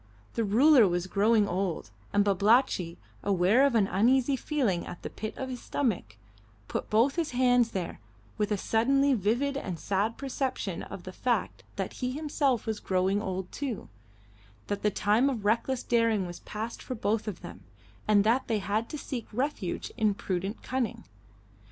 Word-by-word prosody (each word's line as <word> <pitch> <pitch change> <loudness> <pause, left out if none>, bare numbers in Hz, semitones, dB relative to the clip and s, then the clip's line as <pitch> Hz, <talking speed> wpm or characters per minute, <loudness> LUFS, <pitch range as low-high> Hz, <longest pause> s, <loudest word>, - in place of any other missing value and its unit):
The 230 - 0
ruler 240 +3 +6
was 175 0 -1
growing 210 +2 +3
old, 180 - -2 0.2
and 205 0 +3
Babalatchi, 200 -3 +2 0.2
aware 200 +7 +4
of 265 - -1
an 215 -3 +4
uneasy 250 +8 +3
feeling 250 - -1
at 175 - -9
the - - -5
pit 215 - -6
of 265 - -3
his 250 -2 -6
stomach, 180 - -2 0.5
put - - -4
both 235 +8 +3
his 325 -6 -1
hands 245 -2 +4
there 185 -6 -4 0.4
with 210 0 -1
a 210 - +2
suddenly 275 +7 +2
vivid 240 +6 +1
and 185 -11 -4
sad 205 +3 -1
perception 265 -1 -3
of - - -8
the - - -8
fact - - -1
that - - -3
he 250 0 -1
himself 285 -4 0
was 220 -2 -2
growing 190 +2 +1
old 190 -2 -4
too; 265 - -4 0.8
that 205 0 -3
the 210 - +3
time 215 +6 +2
of 230 -7 -4
reckless 235 +4 +1
daring 230 -4 +2
was 175 0 -7
past 220 +2 -6
for 255 - -5
both 220 0 -1
of 200 -5 -5
them, - - -9 0.5
and 205 -1 +5
that 230 +5 +2
they 225 - +1
had 210 +3 -1
to 300 - -5
seek 250 -5 -5
refuge 240 -6 -2
in 215 -2 +2
prudent 195 +2 -3
cunning. 255 -3 -2
220 Hz, 170 wpm, -29 LUFS, 200-255 Hz, 0.8 s, ruler